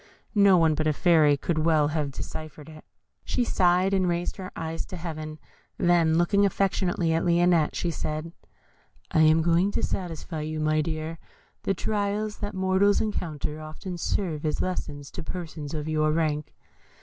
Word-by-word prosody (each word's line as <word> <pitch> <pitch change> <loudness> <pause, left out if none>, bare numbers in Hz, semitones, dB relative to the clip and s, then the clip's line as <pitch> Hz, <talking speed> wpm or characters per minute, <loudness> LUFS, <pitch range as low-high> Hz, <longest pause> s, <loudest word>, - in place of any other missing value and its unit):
(No 200 -3 +6
one 165 -2 +4
but 155 +1 -1
a 155 - +3
Fairy 155 -3 +4
could 160 +2 -1
well 155 -2 +3
have 150 -2 -1
deciphered 150 +2 -8
it.) 155 -1 -12 0.4
She 250 - 0
sighed, 185 -2 +2
and 190 -2 +2
raised 175 0 -2
her 185 -2 -7
eyes 165 0 -4
to 185 - -7
Heaven, 155 -2 -6 0.4
then 170 -2 +3
looking 200 +4 +3
affectionately 185 -3 +1
at 165 - +1
Lionette, 170 -2 +3
she 175 - -1
said, 155 +1 -4 0.8
"I - - +2
am 160 +1 +5
going 170 +3 +3
to - - -1
satisfy 165 -3 -3
you, 155 +1 -4
my 155 0 +2
dear 160 +1 -4
Lionette. - - -31
The 195 - +2
trials 210 +1 -1
that 205 -1 -5
mortals 190 +2 +3
encounter 155 -7 -3
often 155 +4 -7
serve 165 -5 -2
as 155 -1 -1
lessons 145 -6 -4
to - - -6
persons 160 -3 -6
of 150 0 -4
your 155 -1 +1
rank. 155 -2 -1
165 Hz, 170 wpm, -26 LUFS, 155-185 Hz, 0.8 s, No